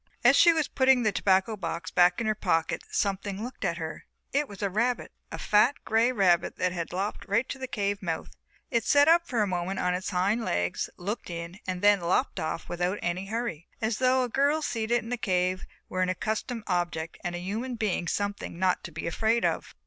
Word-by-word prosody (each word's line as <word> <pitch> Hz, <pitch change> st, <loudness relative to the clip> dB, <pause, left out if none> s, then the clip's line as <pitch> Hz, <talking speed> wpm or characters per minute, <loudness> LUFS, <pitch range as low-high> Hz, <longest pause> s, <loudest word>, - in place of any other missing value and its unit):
As -, -, +7 dB
she 340 Hz, -, +7 dB
was 320 Hz, -2 st, +1 dB
putting 260 Hz, -2 st, +3 dB
the 215 Hz, -, +3 dB
tobacco 195 Hz, +3 st, +2 dB
box 170 Hz, -3 st, -4 dB
back 180 Hz, +2 st, +4 dB
in 230 Hz, -, -2 dB
her 215 Hz, -, +2 dB
pocket 170 Hz, -6 st, 0 dB
something 200 Hz, 0 st, -1 dB
looked 250 Hz, +2 st, -7 dB
in -, -, +2 dB
at 170 Hz, -, -4 dB
her. 160 Hz, -2 st, -6 dB, 0.3 s
It 290 Hz, +1 st, +1 dB
was 200 Hz, 0 st, -8 dB
a 200 Hz, -, +1 dB
rabbit, 240 Hz, +5 st, 0 dB, 0.2 s
a -, -, -5 dB, 0.5 s
grey 225 Hz, +2 st, +3 dB
fat 255 Hz, -, -3 dB
rabbit 180 Hz, -5 st, +3 dB
that 185 Hz, -, +1 dB
had 170 Hz, -2 st, -4 dB
lopped 195 Hz, +3 st, -3 dB
right 230 Hz, +5 st, +1 dB
to 270 Hz, -, -5 dB
the 260 Hz, -, -4 dB
cave 200 Hz, -3 st, -2 dB
mouth; 165 Hz, -4 st, -3 dB, 0.4 s
it 235 Hz, -1 st, +2 dB
sat 285 Hz, +5 st, +5 dB
up 335 Hz, +1 st, +5 dB
for 230 Hz, -5 st, +1 dB
a -, -, 0 dB
moment 185 Hz, +1 st, -2 dB
on 180 Hz, -, +1 dB
its 185 Hz, +1 st, -2 dB
hind 200 Hz, +5 st, +1 dB
legs, 90 Hz, -, -1 dB
looked 205 Hz, +5 st, -4 dB
in, 170 Hz, +2 st, -6 dB
and 185 Hz, 0 st, -3 dB
then 205 Hz, -2 st, +5 dB
lopped 180 Hz, +10 st, 0 dB
off 160 Hz, +1 st, -3 dB
without 180 Hz, +3 st, -1 dB
any 180 Hz, +3 st, -2 dB
hurry, 220 Hz, -7 st, -3 dB
as 220 Hz, 0 st, -1 dB
though 255 Hz, 0 st, +3 dB
a -, -, -1 dB
girl 285 Hz, +5 st, +2 dB
seated 235 Hz, -2 st, 0 dB
in 230 Hz, -, -8 dB
a 245 Hz, -, 0 dB
cave 185 Hz, -3 st, 0 dB, 0.2 s
were 185 Hz, -, -2 dB
an 185 Hz, -, +2 dB
accustomed 220 Hz, +5 st, -2 dB
object 175 Hz, -3 st, -2 dB
and 175 Hz, 0 st, -3 dB
a -, -, -4 dB
human 220 Hz, +8 st, -3 dB
being 205 Hz, -6 st, -1 dB
something 200 Hz, -2 st, -3 dB
not 185 Hz, 0 st, +1 dB
to -, -, -7 dB
be -, -, -6 dB
afraid 220 Hz, +7 st, +1 dB
of. -, -, -2 dB
200 Hz, 220 wpm, -28 LUFS, 180-235 Hz, 0.5 s, As